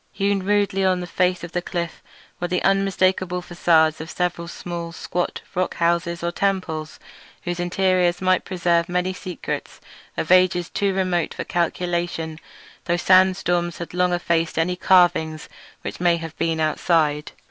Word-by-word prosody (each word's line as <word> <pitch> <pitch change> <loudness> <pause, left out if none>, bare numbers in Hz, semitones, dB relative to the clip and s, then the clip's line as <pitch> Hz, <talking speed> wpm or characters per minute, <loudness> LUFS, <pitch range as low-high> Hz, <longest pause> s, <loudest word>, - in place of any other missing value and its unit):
Hewn 200 -1 0
rudely 200 -1 +1
on 185 -1 +2
the 180 - -4
face 180 0 0
of 175 - -7
the 175 - -1
cliff 170 -2 -4 0.4
were 175 - -1
the 180 0 -1
unmistakable 185 -2 +1
facades 160 -3 +2
of 160 - -7
several 175 -1 -2
small, 170 -1 -6
squat 175 +1 -3
rock 185 +1 -1
houses 170 0 0
or 170 - 0
temples; 175 -5 -2 0.4
whose 175 0 -3
interiors 180 0 +1
might 185 0 +2
preserve 170 -2 +1
many 180 +1 0
secrets 180 -1 -6 0.4
of 160 - -2
ages 180 -1 +4
too 200 -1 0
remote 185 -3 0
for - - -3
calculation, 170 -2 -2 0.5
though 175 - +1
sandstorms 180 -2 +3
had 170 - -7
long 180 0 +2
since 175 0 -1
effaced 165 -1 0
any 175 +2 +1
carvings 175 -4 +3 0.4
which - - -6
may 175 -1 +3
have 165 -1 -7
been 165 -1 0
outside. 155 -1 +1
175 Hz, 155 wpm, -22 LUFS, 170-185 Hz, 0.5 s, ages